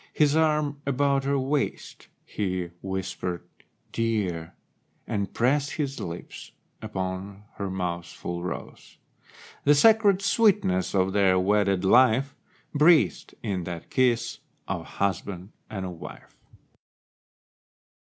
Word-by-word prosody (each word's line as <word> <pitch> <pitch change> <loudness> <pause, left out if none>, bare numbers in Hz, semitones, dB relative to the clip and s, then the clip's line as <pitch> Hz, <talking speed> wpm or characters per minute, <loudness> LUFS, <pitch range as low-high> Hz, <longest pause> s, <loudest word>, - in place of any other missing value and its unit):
His 150 -1 +3
arm 150 -2 +1
about 140 0 +1
her 140 0 +1
waist, 135 +2 -2 0.2
he 90 -4 -3
whispered 95 -2 -4 0.5
"Dear," 100 -8 -2 0.5
And 100 -1 -2
pressed 140 +4 +1
his 140 -4 -3
lips 85 +1 -8 0.3
upon 95 -1 -5
her 100 -1 -3
mouth's 90 -2 -3
full 85 0 -5
rose— 90 - -7 0.7
The 145 +1 +5
sacred 205 +2 +5
sweetness 180 - +2
of 95 0 +2
their 95 -2 +4
wedded 100 0 +2
life 130 +5 +4 0.4
Breathed 155 +2 +3
in 95 -5 -2
that 85 -2 -7
kiss 125 -3 +1 0.3
of - - -3
husband 100 0 -3 0.2
and 95 -3 -4
of 90 -3 -7
wife. - - -11
105 Hz, 110 wpm, -26 LUFS, 95-140 Hz, 0.7 s, The